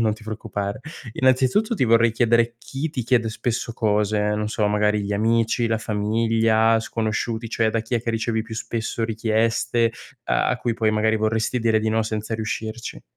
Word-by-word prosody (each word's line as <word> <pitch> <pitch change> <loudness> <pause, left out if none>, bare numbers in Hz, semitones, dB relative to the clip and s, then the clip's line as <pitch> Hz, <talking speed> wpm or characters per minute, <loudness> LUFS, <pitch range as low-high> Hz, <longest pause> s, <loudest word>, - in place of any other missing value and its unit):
non 110 -1 +2
ti 110 - -16
preoccupare. 105 -1 -4 0.3
Innanzitutto, 130 - +2
ti 130 - +2
vorrei 115 0 +4
chiedere 115 0 +2
chi 140 +5 -4
ti 130 -5 -3
chiede 120 -2 +2
spesso 115 +1 -3
cose, 105 -1 +1
non 105 0 -2
so, 110 -1 0
magari 105 0 +2
gli 100 +1 -3
amici, 115 +2 +1
la 110 0 +1
famiglia, 110 +1 +2
sconosciuti, 115 +1 -2
cioè 115 -1 +1
da 115 - 0
chi 115 +2 -4
è 115 - +1
che 115 - -1
ricevi 115 0 -1
più 110 0 -8
spesso 115 0 -3
richieste 115 +1 +1 0.3
a - - +1
a - - +1
cui 120 -2 -2
poi 110 -1 +1
magari 110 +1 +2
vorresti 110 +3 0
dire 110 -1 +3
di 110 - -1
no 110 +1 +1
senza 110 0 -3
riuscirci? 110 +1 -5
110 Hz, 180 wpm, -23 LUFS, 110-115 Hz, 0.3 s, vorrei